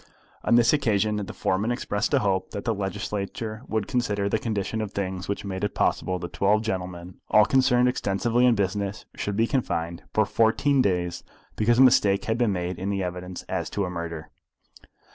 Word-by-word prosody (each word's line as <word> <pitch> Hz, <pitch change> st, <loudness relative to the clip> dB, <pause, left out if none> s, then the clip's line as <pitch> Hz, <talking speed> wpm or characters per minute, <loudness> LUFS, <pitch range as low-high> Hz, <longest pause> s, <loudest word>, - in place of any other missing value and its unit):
On -, -, +3 dB
this 120 Hz, +2 st, +5 dB
occasion 110 Hz, -7 st, +1 dB
the 100 Hz, -2 st, -4 dB
foreman 100 Hz, +5 st, -1 dB
expressed 115 Hz, -3 st, -1 dB
a 145 Hz, -, +4 dB
hope 95 Hz, -1 st, 0 dB
that 100 Hz, -, -5 dB
the 115 Hz, -, +1 dB
Legislature 105 Hz, +2 st, -4 dB
would 110 Hz, -2 st, -1 dB
consider 105 Hz, -5 st, 0 dB
the 110 Hz, -, 0 dB
condition 110 Hz, 0 st, -2 dB
of 105 Hz, -2 st, -4 dB
things 95 Hz, -1 st, -3 dB
which 100 Hz, +1 st, -3 dB
made 95 Hz, -1 st, -4 dB
it 105 Hz, -, -1 dB
possible 95 Hz, -, 0 dB
that 85 Hz, -1 st, -7 dB
twelve 105 Hz, +2 st, +2 dB
gentlemen 90 Hz, -4 st, -5 dB
all 105 Hz, 0 st, +6 dB
concerned 125 Hz, -2 st, +3 dB
extensively 120 Hz, +1 st, +1 dB
in 120 Hz, -, +4 dB
business 100 Hz, 0 st, -2 dB
should 100 Hz, -1 st, -3 dB
be 115 Hz, -, +4 dB
confined 85 Hz, -10 st, -2 dB
for 110 Hz, -, +2 dB
fourteen 120 Hz, +7 st, +2 dB
days 90 Hz, -5 st, -1 dB, 0.3 s
because 115 Hz, +2 st, +2 dB
a 130 Hz, -, +8 dB
mistake 105 Hz, -5 st, +4 dB
had 110 Hz, 0 st, -1 dB
been 120 Hz, -4 st, +2 dB
made 90 Hz, -1 st, -3 dB
in 95 Hz, +2 st, -2 dB
the 100 Hz, -1 st, -1 dB
evidence 90 Hz, 0 st, -5 dB
as -, -, -3 dB
to 100 Hz, -, -1 dB
a 90 Hz, -, -4 dB
murder. 85 Hz, -2 st, -6 dB
100 Hz, 190 wpm, -25 LUFS, 95-115 Hz, 0.3 s, a